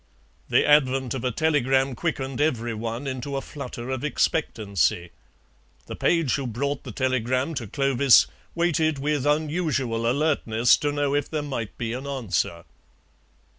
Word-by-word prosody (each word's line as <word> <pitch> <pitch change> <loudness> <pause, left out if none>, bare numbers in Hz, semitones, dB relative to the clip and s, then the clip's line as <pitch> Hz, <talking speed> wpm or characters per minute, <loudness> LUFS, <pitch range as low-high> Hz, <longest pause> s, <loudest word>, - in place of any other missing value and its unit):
The - - +3
advent 135 -4 +3
of 130 - -4
a 125 - +1
telegram 135 -1 +1
quickened 135 -2 -3
every 120 -6 0
one 115 +4 -4
into 135 +1 -4
a - - -2
flutter 125 -3 -7
of 130 0 -3
expectancy; 100 - 0 0.7
the - - -7
page 165 -7 +1
who 140 -3 -1
brought 140 +5 -2
the - - -7
telegram 130 +3 0
to 125 -7 -4
Clovis 135 +1 +4 0.3
waited 165 -3 +1
with 145 0 -1
unusual 145 -7 0
alertness 125 -5 +3
to 145 - -1
know 145 -1 0
if 145 0 0
there 155 -2 -2
might 125 -7 -5
be 115 -1 -3
an 130 +3 -5
answer. 100 - -2
135 Hz, 145 wpm, -25 LUFS, 120-145 Hz, 0.7 s, Clovis